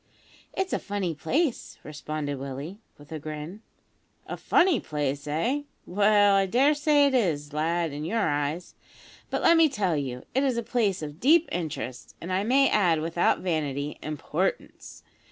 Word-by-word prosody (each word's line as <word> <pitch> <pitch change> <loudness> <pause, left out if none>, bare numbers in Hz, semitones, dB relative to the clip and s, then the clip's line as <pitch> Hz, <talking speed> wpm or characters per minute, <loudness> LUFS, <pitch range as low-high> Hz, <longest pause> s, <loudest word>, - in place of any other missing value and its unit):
"It's 380 0 -2
a - - +1
funny 200 -4 -3
place," 265 - -1
responded 150 -2 -5
Willie, 140 +8 -7 0.2
with 145 +2 -17
a 160 - -4
grin. 155 +6 -7 0.6
"A - - -5
funny 350 -8 +3
place 145 -1 -3
eh? 230 - 0 0.2
Well, 205 +1 +4
I 195 0 +3
daresay 290 +5 +3
it 280 - +1
is, 155 - 0
lad, 165 +2 0
in 145 +1 -5
your 215 +6 0
eyes; 145 +3 -2 0.6
but - - -2
let 335 - +6
me 325 -1 +5
tell 195 - 0
you, 130 -3 -4
it 265 - +2
is 265 -4 0
a 235 - -1
place 215 -8 0
of 150 +1 -7
deep 320 - +4
interest, 135 -8 -5
and, 185 +2 -5
I 190 +2 +1
may 270 +5 +4
add 175 -6 +2
without 165 +2 +1
vanity, 150 -5 -2
importance. 155 +4 -4
175 Hz, 160 wpm, -26 LUFS, 150-230 Hz, 0.6 s, let